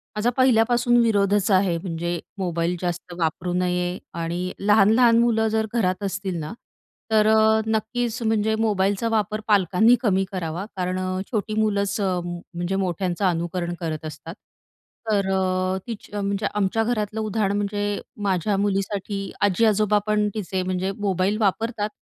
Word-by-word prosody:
माझा 210 +3 +1
पहिल्यापासून 240 -1 +4
विरोधच 205 -2 +2
आहे 185 -3 +3
म्हणजे 170 -1 -3 0.2
मोबाईल 175 -2 -1
जास्त 175 0 -4
वापरू 170 +2 -1
नये 180 0 0 0.2
आणि 175 +2 -3
लहान-लहान 220 +3 +5
मुलं 225 -2 +2
जर 220 0 0
घरात 195 -3 0
असतील 195 -2 -3
ना, 150 +2 -5 0.6
तर 215 -1 +4
अ, 220 0 +4
नक्कीच 225 +2 -1
म्हणजे 220 0 +1
मोबाईलचा 205 -1 +1
वापर 215 -1 0
पालकांनी 205 +3 +4
कमी 195 -5 +2
करावा 175 0 -4
कारण 185 0 -2
अ, 185 0 -2
छोटी 215 -1 -2
मुलंच 200 -2 0
म्हणजे 175 0 -3
मोठ्यांचं 185 0 -1
अनुकरण 175 0 -1
करत 160 -2 -4
असतात. 155 +3 -8 0.7
तर 200 -2 +1
अ, 185 0 0
तिच 225 -3 -7
म्हणजे 200 0 -2
आमच्या 210 +2 +1
घरातलं 220 -2 -2
उदाहरण 210 -2 0
म्हणजे 205 0 -2 0.2
माझ्या 195 +1 +1
मुलीसाठी 195 0 -2
आजी, 205 +2 +3
आजोबा 210 -1 +3
पण 210 0 +2
तिचे 190 -3 -3
म्हणजे 185 +1 -1
मोबाईल 195 0 0
वापरतात, 215 +1 0
200 Hz, 140 wpm, -23 LUFS, 180-215 Hz, 0.7 s, लहान-लहान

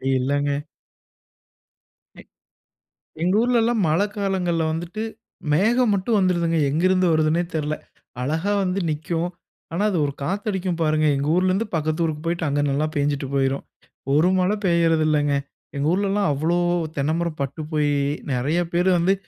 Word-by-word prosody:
இல்லங்க. 140 +2 0 1.6
அ - - -14 1.0
எங்க 185 +3 +2
ஊர்லலாம் 235 -3 +2
மழைக்காலங்கள்ல 190 -2 0
வந்துட்டு 175 +7 -4 0.5
மேகம் 225 +6 +3
மட்டும் 205 +3 +1
வந்துருதுங்க. 170 -3 +1
எங்கிருந்து 185 +4 +2
வருதுன்னே 155 +2 +2
தெரில! 155 -1 -1 0.5
அழகா 160 +9 0
வந்து 185 +1 -1
நிக்கும். 165 +3 -2 0.4
ஆனா, 190 - 0
அது 180 - 0
ஒரு 140 - -3
காத்தடிக்கும் 190 -1 -2
பாருங்க, 155 0 +2
எங்க 140 +1 -1
ஊர்லருந்து 185 +4 +1
பக்கத்து 155 +1 0
ஊருக்கு 155 0 -3
போய்ட்டு, 170 -1 -1
அங்க 145 +1 +1
நல்லா 145 +3 +1
பேஞ்சுட்டு 145 -1 0
போயிரும். 135 0 0 0.5
ஒரு 160 +5 +4
மழை 185 +3 +2
பேயுறதில்லைங்க. 155 -4 +2 0.4
எங்க 145 +2 0
ஊர்லலாம் 200 -1 +1
அவ்வளோ 160 +5 0 0.4
தென்ன 140 +2 +1
மரம் 170 -3 -3
பட்டு 140 +4 -3
போயி, 150 -1 +1 0.4
நெறைய 140 +7 0
பேர் 180 +2 +2
வந்து 175 +3 +3
170 Hz, 130 wpm, -23 LUFS, 150-190 Hz, 1.6 s, ஒரு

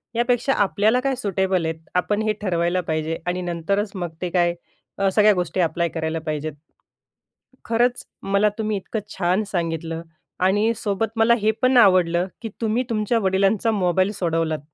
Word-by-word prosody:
यापेक्षा 245 +3 +1
आपल्याला 215 +5 +2
काय 270 0 0
सुटेबल 190 -6 0
आहेत 160 0 -3 0.2
आपण 205 +4 +1
हे 215 -1 +1
ठरवायला 175 -2 0
पाहिजे 160 +1 -1
आणि 180 +1 -1
नंतरच 180 +4 -1
मग 175 -2 -3
ते 180 - -2
काय 175 -1 +2 0.4
अ, 195 -1 +2
सगळ्या 210 +1 +5
गोष्टी 180 0 -2
अप्लाय 170 +1 0
करायला 160 0 -3
पाहिजेत. 155 0 -3 1.1
खरंच 240 +2 +1 0.2
मला 200 +2 +2
तुम्ही 215 -1 -1
इतकं 210 +3 -4 0.2
छान 185 +3 +1
सांगितलं 165 -2 -2 0.5
आणि 210 +4 +2
सोबत 210 +2 -1
मला 225 +1 +5
हे 215 +1 +3
पण 255 0 +4
आवडलं, 185 -5 +4
की 225 - -5
तुम्ही 225 +3 +1
तुमच्या 225 +1 +1
वडिलांचा 195 +3 +2
मोबाईल 185 -1 +1
सोडवलात 165 -4 -1
190 Hz, 155 wpm, -22 LUFS, 170-215 Hz, 1.1 s, सगळ्या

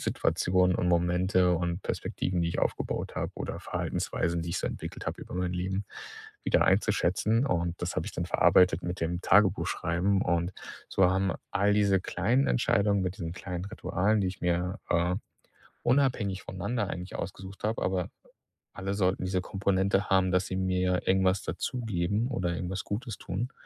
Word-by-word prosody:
Situationen 90 0 +2
und 90 - 0
Momente 90 +1 +3
und 85 +2 -2
Perspektiven, 90 -1 -2
die 85 - +1
ich - - -3
aufgebaut - - -2
habe - - -2
oder - - -5
Verhaltensweisen, 85 0 -2
die 85 - -4
ich - - -1
so - - -2
entwickelt - - -7
habe - - -3
über - - -9
mein 90 0 -1
Leben, 95 +3 -2 0.6
wieder - - +3
einzuschätzen. 105 +3 +2
Und 85 -6 -1
das 90 - -2
habe - - -1
ich - - -5
dann - - -3
verarbeitet 90 -1 +4
mit 90 +1 -4
dem 85 +1 -1
Tagebuch 100 -1 +4
schreiben. 90 +4 +1
Und 85 +1 0 0.4
so 95 - +3
haben 95 0 +1 0.2
all 100 +1 +2
diese 100 -2 +4
kleinen 115 +10 +1
Entscheidungen 100 - +2
mit 90 +1 -2
diesen 85 -3 -4
kleinen 90 -1 -5
Ritualen, 100 0 0
die 95 - +1
ich 90 - -7
mir, 90 +3 0
äh, 85 +1 +2 0.7
unabhängig 120 -7 +2
voneinander 100 +3 -2
eigentlich 90 +1 -6
ausgesucht 95 +2 -7
habe, 110 +2 0
aber 90 -1 -1 0.6
alle 95 +1 -3
sollten 95 -2 +1
diese 95 0 0
Komponente 95 +1 0
haben, 95 -1 +3
dass 90 0 +2
sie 95 - -3
mir 90 -1 0
irgendwas 95 0 +3
dazugeben 105 +2 -1
oder 90 -9 -1
irgendwas 90 +2 -3
Gutes 115 +3 -4
tun. 125 +3 -3
95 Hz, 165 wpm, -29 LUFS, 90-100 Hz, 0.7 s, verarbeitet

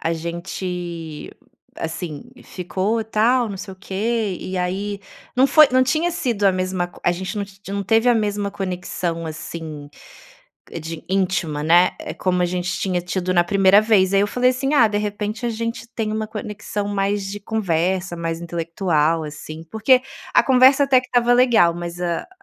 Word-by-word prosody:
A 165 - -1
gente, 170 -1 -5 0.5
assim, 160 -2 -5 0.2
ficou 195 +5 -2
tal, 225 +2 +2
não 200 - -5
sei 190 0 -8
o - - -13
quê, 205 +1 -2
e 185 0 -5
aí 195 +3 -2 0.4
não 260 - +5
foi 305 0 +7
não 255 - +5
tinha 315 +7 +1
sido 240 -11 -2
a 195 - +5
mesma 185 -1 -1
co 175 - -17
a - - +4
gente 190 +4 -5
não 205 - -1
ti 200 0 -18
não 200 0 -2
teve 225 +4 +3
a 245 - +5
mesma 205 -2 -1
conexão, 180 -3 -4
assim, 155 -1 -7 0.9
de 160 +1 -7
íntima, 180 -6 0
né, 175 +3 +5 0.3
como 180 -1 +1
a - - +3
gente 180 0 -2
tinha 185 -2 -1
tido 180 +1 -2
na 175 -1 +4
primeira 195 +2 +5
vez, 200 -4 +3
aí 195 - +5
eu 205 - +2
falei 250 +3 +2
assim: 270 +3 -1
"Ah, 235 -6 +6
de 205 -1 -1
repente 210 +2 -4
a 235 - 0
gente 230 +1 -4
tem 215 -2 -2
uma 215 0 -2
conexão 210 -1 -5
mais 200 0 -1
de 200 +1 -5
conversa 185 -3 -1
mais 165 -1 -3
intelectual 165 -2 0
assim.", 155 +1 -8
porque 250 +4 +4 0.3
a - - +6
conversa 265 +2 +6
até 270 -2 +5
que 255 - -13
estava 245 -1 +3
legal 240 -9 +5
mas 175 0 -6
a 175 - -2
195 Hz, 180 wpm, -21 LUFS, 175-220 Hz, 0.9 s, foi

